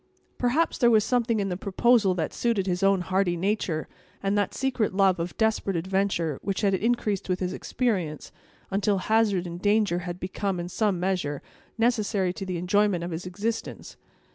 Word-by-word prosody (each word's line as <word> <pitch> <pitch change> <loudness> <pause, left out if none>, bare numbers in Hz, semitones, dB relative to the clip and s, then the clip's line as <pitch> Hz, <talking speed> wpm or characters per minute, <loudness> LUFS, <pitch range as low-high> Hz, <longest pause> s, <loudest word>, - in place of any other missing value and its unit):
Perhaps 255 +7 +1
there 240 - +5
was 220 -2 +5
something 235 -2 +1
in 195 -1 -1
the 180 - -2
proposal 200 +1 +2
that 160 -3 -2
suited 230 -5 0
his 180 -1 -1
own 195 -1 +3
hardy 185 -1 0
nature, 180 -4 -1 0.4
and 195 +1 +1
that 205 -2 0
secret 250 -7 0
love 190 -3 +3
of 170 +1 -4
desperate 220 -3 +1
adventure, 175 -4 0
which 195 -2 -2
had 200 -2 +2
increased 210 -1 0
with 185 0 0
his 180 -1 -2
experience, 185 - -2 0.4
until 200 +1 +1
hazard 205 -2 +2
and 175 0 -7
danger 205 -3 +2
had 175 0 -6
become, 190 0 -2
in 175 0 -4
some 200 -2 0
measure, 175 -6 -1 0.3
necessary 215 -5 +1
to 195 +1 -6
the 180 -1 -2
enjoyment 185 0 +1
of 175 - -4
his 170 +3 -5
existence. 215 +5 -4
195 Hz, 175 wpm, -26 LUFS, 180-215 Hz, 0.4 s, there